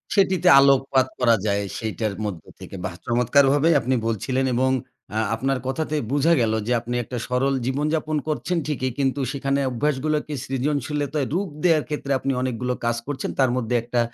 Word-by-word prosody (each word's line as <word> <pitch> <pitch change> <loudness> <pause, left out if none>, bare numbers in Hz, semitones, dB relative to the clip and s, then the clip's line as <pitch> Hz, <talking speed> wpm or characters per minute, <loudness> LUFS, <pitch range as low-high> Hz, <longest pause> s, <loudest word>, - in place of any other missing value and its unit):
সেটিতে 185 -3 +3
আলোকপাত 135 -1 +4
করা 115 -2 +5
যায়, 100 -1 +1 0.2
সেটার 110 -2 -2
মধ্য 90 -7 -5 0.2
থেকে। - - -9
বাহ্! 90 -2 -5
চমৎকারভাবেই 140 +6 +3
আপনি 130 +2 0
বলছিলেন, 130 +4 -1
এবং 130 +1 +2 0.4
আ 110 - +1 0.2
আপনার 135 +3 0
কথাতে 155 +3 -2 0.2
বুঝা 145 +4 +3
গেল 110 -1 +1
যে, - - -1
আপনি 120 +1 -4
একটা 125 +2 -6
সরল 135 +2 +1
জীবনযাপন 150 +3 -1
করছেন 165 +3 -1
ঠিকই, 130 -4 -1
কিন্তু 135 +1 +1
সেখানে 140 0 -1
অভ্যাস 135 +4 0
গুলোকে 150 0 -1
সৃজনশীলতায় 145 +1 -1
রূপ 185 +1 -1
দেওয়ার 160 -4 +4
ক্ষেত্রে 145 -2 -3
আপনি 135 - -1
অনেকগুলো 125 0 -1
কাজ 120 0 +1
করছেন। 145 -2 -3
তার 130 -2 +4
মধ্যে 125 -1 -1
একটা, 120 0 -1
135 Hz, 165 wpm, -23 LUFS, 125-150 Hz, 0.4 s, করা